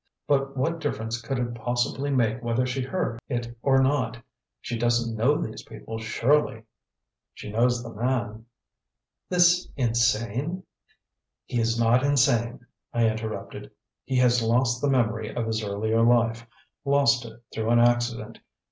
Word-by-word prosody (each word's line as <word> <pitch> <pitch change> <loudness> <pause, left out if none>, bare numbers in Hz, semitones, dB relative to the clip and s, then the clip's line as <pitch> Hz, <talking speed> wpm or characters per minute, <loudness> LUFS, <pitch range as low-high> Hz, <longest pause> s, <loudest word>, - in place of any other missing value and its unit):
But 135 -1 0
what 165 +5 0
difference 115 -6 -3
could 130 +3 -3
it 120 -1 -2
possibly 120 +4 -1
make 125 -3 +1
whether 120 +1 0
she 130 +1 -2
heard 130 -4 -2
it 120 -2 -3
or 135 -1 +4
not? 130 -3 0 0.4
She 120 - -5
doesn't 120 0 0
know 130 +7 +2
these 110 - -5
people, 110 +1 -8
surely?" 115 +2 +1 0.7
"She 105 - -8
knows 120 +2 +1
the 115 -1 -8
man." 115 -1 -2 0.8
"This 175 0 +4
insane 120 - 0 0.4
" - - -61
"He 120 - -2
is 115 0 0
not 115 +2 +4
insane," 120 -4 +2 0.3
I 115 -1 +2
interrupted. 110 0 -5 0.3
"He 130 - -2
has 125 -1 +4
lost 120 +2 +1
the 145 - +1
memory 110 -4 0
of 120 - -1
his 110 0 -2
earlier 110 +2 0
life 115 -1 +2 0.4
lost 140 -3 +3
it 115 0 -11
through 110 0 -2
an 120 0 +4
accident. 120 -2 +1
120 Hz, 145 wpm, -26 LUFS, 115-130 Hz, 0.8 s, or